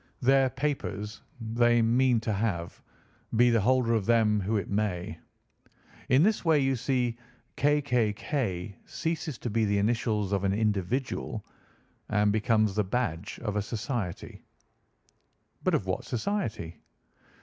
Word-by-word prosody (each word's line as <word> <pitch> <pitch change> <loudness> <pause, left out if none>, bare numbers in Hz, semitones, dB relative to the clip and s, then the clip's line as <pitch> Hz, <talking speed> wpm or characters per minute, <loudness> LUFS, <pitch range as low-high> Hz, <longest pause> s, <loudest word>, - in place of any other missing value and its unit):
Their 135 +1 +4
papers 125 -6 -3 0.2
they 120 +1 +2
mean 120 +1 +3
to 110 -1 -1
have, 95 -5 -2 0.5
be 120 +2 +5
the 115 -2 +3
holder 125 +1 +3
of 110 -3 0
them 110 -3 +4
who 105 +4 0
it 100 - -3
may. 100 -4 -2 0.9
In 130 +4 +5
this 215 +2 +2
way 160 -3 +4
you 135 -1 +2
see 120 -1 -1 0.4
K. 145 +1 +2
K. 125 -6 +2
K. 105 -5 -3
ceases 160 -4 -3
to 120 - -4
be 115 +1 +1
the 100 -1 +1
initials 105 -1 0
of 100 -1 0
an 95 0 +2
individual 110 +2 -1 0.6
and 105 -1 +3
becomes 110 -1 +2
the 105 +1 +1
badge 100 -4 -2
of 105 -3 -2
a 105 - +1
society." 110 - -4 1.2
"But - - +2
of - - -1
what - - -2
society?" 115 - -3
115 Hz, 140 wpm, -28 LUFS, 105-125 Hz, 1.2 s, be